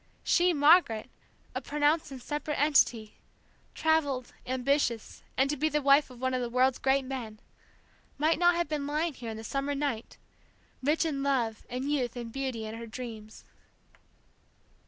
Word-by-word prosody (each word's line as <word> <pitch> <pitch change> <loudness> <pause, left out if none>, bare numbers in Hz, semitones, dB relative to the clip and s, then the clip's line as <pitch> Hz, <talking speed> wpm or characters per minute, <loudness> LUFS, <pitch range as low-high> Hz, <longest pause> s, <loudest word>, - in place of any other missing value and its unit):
she, 355 0 +3
Margaret, 290 -7 +4 0.4
a - - -3
pronounced 300 +2 +1
and 270 -2 -8
separate 295 +3 -3
entity, 245 -7 +2 0.6
travelled, 285 -6 +1
ambitious, 255 -2 0 0.2
and 270 - +4
to - - -1
be 305 +3 +1
the 300 0 +1
wife 280 0 +4
of 250 -2 -13
one 260 0 -1
of 255 - 0
the 240 - -2
world's 255 +1 +2
great 265 0 +2
men, 240 -5 -6 0.8
might 315 +3 +2
not 350 0 +5
have 345 -2 0
been 295 -2 -3
lying 305 +2 -1
here 240 -3 -7
in 220 - -5
the 220 - -8
summer 275 +4 -2
night, 275 -6 -3 0.6
rich 300 +5 +2
in 285 -4 -2
love 245 -6 -1
and 260 +3 -3
youth 255 -5 -1
and 235 -2 -6
beauty 260 -5 -3
and 220 +1 -6
her 230 - -7
dreams! 220 -2 -8
275 Hz, 165 wpm, -29 LUFS, 240-295 Hz, 0.8 s, not